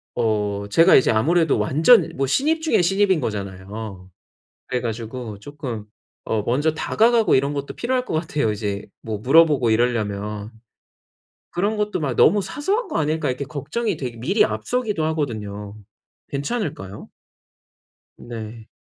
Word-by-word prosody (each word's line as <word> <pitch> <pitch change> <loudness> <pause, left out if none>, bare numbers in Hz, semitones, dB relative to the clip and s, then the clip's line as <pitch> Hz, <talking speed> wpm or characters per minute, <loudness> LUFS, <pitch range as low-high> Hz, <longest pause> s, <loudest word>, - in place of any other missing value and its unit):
어 105 -3 -1
제가 165 +10 +6
이제 130 - +5
아무래도 160 +7 +2
완전 160 - +4
뭐 135 - 0
신입 310 - +1
중에 315 - +2
신입인 195 -1 +3
거잖아요. 100 -2 -6 0.6
그래 125 - -1
가지고 115 -1 -5
쪼끔 130 -5 -6 0.4
어 110 -2 -1
먼저 145 +6 +1
다가가고 225 +6 +3
이런 140 +2 +2
것도 140 0 -4
필요할 255 +1 -1
것 - - -6
같아요 155 -7 0
이제 105 -1 -4 0.2
뭐 110 -2 -4
물어보고 140 -1 +4
이러려면. 105 -3 -1 1.0
그런 200 +5 0
것도 210 -3 -1
막 135 -5 -2
'너무 205 -1 +5
사소한 385 - -2
거 - - -3
아닐까?' 155 +1 0
이렇게 130 +2 -2
걱정이 160 - -3
되기 125 -4 -5
미리 180 - +2
앞서기도 220 -10 -2
하거든요. 105 -9 -4 0.5
괜찮을까요? 140 - -4 1.1
네. 115 -1 -8
135 Hz, 310 characters per minute, -22 LUFS, 110-170 Hz, 1.1 s, 제가